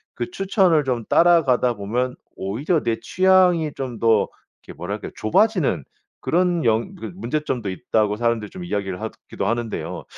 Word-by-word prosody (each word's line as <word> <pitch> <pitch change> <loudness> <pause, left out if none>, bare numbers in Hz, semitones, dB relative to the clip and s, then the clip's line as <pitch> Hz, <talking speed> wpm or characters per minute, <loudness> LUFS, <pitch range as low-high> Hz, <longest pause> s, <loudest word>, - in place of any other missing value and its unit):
그 355 - -3
추천을 190 - +2
좀 125 -4 -2
따라가다 140 -8 +4
보면 120 +5 -2 0.2
오히려 135 - -1
내 115 -1 -1
취향이 185 -4 +3
좀 125 -4 -5
더 115 -2 +3 0.4
이렇게 - - -11
뭐랄까요. 100 +5 -5
"좁아지는 145 - +2 0.4
그런 175 -1 +1
영 115 - +1
그런 180 - -8
문제점도 125 - -2
있다."고 105 +3 0
사람들이 115 -2 0
좀 185 - -8
이야기를 95 - -3
하기도 - - -6
하는데요. 115 0 -3
125 Hz, 350 characters per minute, -22 LUFS, 110-175 Hz, 0.4 s, 따라가다